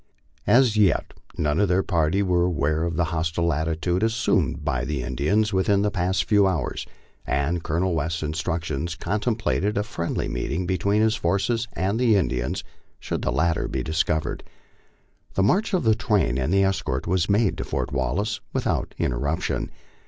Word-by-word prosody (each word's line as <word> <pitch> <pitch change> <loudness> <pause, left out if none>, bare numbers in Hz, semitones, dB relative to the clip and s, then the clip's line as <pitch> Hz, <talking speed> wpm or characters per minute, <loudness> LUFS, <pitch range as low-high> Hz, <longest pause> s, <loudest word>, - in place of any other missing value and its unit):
As 120 0 +5
yet 100 -4 +2 0.2
none 75 0 +1
of 105 - +3
their 95 +2 +2
party 85 +2 +1
were 90 -2 +2
aware 80 -2 +1
of 85 -1 -2
the 85 - +2
hostile 85 +1 0
attitude 80 +4 -1
assumed 105 -8 +1
by 65 -5 0
Jie 70 -4 -2
Indians 95 - 0
within 100 +1 +2
the 105 - +1
past 95 -1 0
few 105 -2 +4
hours, 85 -9 -2 0.4
and 70 +6 0
Colonel 85 +4 0
West's 85 +1 -1
instructions 80 0 -2
con 105 +5 -2
templated 110 -3 0
a 105 - +1
friendly 85 -6 -3
meeting 70 +8 -2
between 100 +4 +1
his 110 0 +3
forces 110 +5 0
and 100 +4 -1
the 120 -4 +4
Indians 65 -10 -1 0.4
should - - -3
the - - 0
latter 80 +6 +1
be 65 -1 -3
discovered. 80 0 -1 0.9
The 95 - +2
march 190 - +2
of 185 -5 +1
the 110 -2 +4
train 105 - +1
and 65 +5 0
escort 95 -9 +1
was 90 0 0
made 100 0 +3
to - - -1
Fort - - -3
Wallace 75 - -1
without - - -1
interruption. 70 +7 -1
85 Hz, 165 wpm, -24 LUFS, 80-105 Hz, 0.9 s, As